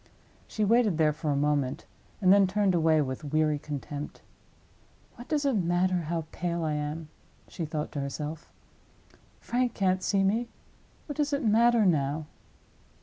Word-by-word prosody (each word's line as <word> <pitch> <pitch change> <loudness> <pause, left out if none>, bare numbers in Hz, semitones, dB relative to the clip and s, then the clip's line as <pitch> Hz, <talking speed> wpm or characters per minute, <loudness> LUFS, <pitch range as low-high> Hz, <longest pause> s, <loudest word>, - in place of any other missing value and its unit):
She 215 - -1
waited 220 -5 +3
there 155 -2 +3
for 155 +1 -4
a 145 - +2
moment, 145 0 0 0.4
and 185 -1 +6
then 200 -1 +5
turned 200 0 +1
away 160 -2 +3
with 130 +2 -5
weary 155 0 +1
contempt. 145 0 -6 0.9
"What 240 - -12
does 300 -2 0
it 275 - +2
matter 180 -2 +1
how 165 -2 -2
pale 170 0 -2
I 155 -1 0
am?" 150 +1 -4 0.4
she 170 - -5
thought 150 0 -4
to 145 - -3
herself. 150 +3 -5 0.9
"Frank 245 0 -1
can't 185 -2 +1
see 195 +1 +1
me—what 235 +6 -5
does 295 -1 0
it 280 -2 0
matter 230 +1 +4
now!" 150 -3 +1
170 Hz, 150 wpm, -28 LUFS, 150-210 Hz, 0.9 s, and